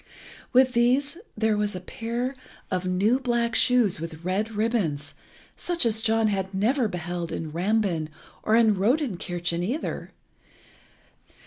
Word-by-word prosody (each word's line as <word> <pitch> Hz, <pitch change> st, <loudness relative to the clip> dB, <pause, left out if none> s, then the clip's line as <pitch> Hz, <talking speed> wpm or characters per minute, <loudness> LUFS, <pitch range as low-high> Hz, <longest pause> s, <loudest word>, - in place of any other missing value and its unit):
With 255 Hz, 0 st, +4 dB
these 255 Hz, +5 st, +2 dB, 0.2 s
was 210 Hz, -2 st, +1 dB
a -, -, -4 dB
pair 235 Hz, +7 st, -4 dB, 0.4 s
of 185 Hz, 0 st, -1 dB
new 200 Hz, +8 st, +2 dB
black 240 Hz, -2 st, 0 dB
shoes 230 Hz, -11 st, +3 dB
with 165 Hz, -1 st, -7 dB
red 205 Hz, +5 st, -1 dB
ribbons, 200 Hz, -10 st, -1 dB, 0.4 s
such 345 Hz, -6 st, +1 dB
as 220 Hz, -1 st, +3 dB
John 225 Hz, 0 st, +2 dB
had 190 Hz, -1 st, -2 dB
never 235 Hz, +5 st, +2 dB
beheld 175 Hz, -2 st, -4 dB
in 160 Hz, -2 st, -4 dB
Rambin 180 Hz, -2 st, 0 dB, 0.3 s
or 215 Hz, -, +2 dB
in 225 Hz, -2 st, +5 dB
Rodinkirchen 185 Hz, -, 0 dB
either. 245 Hz, -, -3 dB
215 Hz, 125 wpm, -25 LUFS, 180-240 Hz, 0.4 s, in